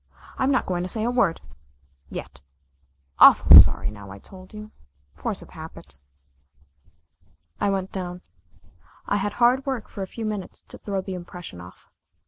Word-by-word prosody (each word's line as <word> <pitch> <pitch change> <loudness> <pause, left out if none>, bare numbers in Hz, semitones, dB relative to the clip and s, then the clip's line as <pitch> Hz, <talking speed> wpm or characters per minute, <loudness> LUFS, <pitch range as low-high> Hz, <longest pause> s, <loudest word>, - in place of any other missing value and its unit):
I'm 260 - +1
not 265 -3 +1
going 180 -1 -2
to 180 - -4
say 220 +2 -1
a 240 - 0
word 200 -9 +1 0.7
yet. 70 - -9 0.8
Awful - - +8
sorry - - +3
now 100 -2 -12
I 95 - -10
told 185 - -15
you. 215 0 -10 0.4
Force - - -3
of - - -17
habit." 70 -1 -10 1.6
I - - +1
went 190 -1 -2
down. 180 -1 -6 0.8
I 205 - 0
had 205 +1 -2
hard 245 +4 +3
work 265 -5 -4
for 200 - -9
a 190 - -4
few 225 +3 -7
minutes 210 -4 -6
to - - -12
throw 195 -2 -3
the 190 0 -7
impression 175 - -9
off. 90 +1 -15
190 Hz, 160 wpm, -24 LUFS, 175-215 Hz, 1.6 s, Awful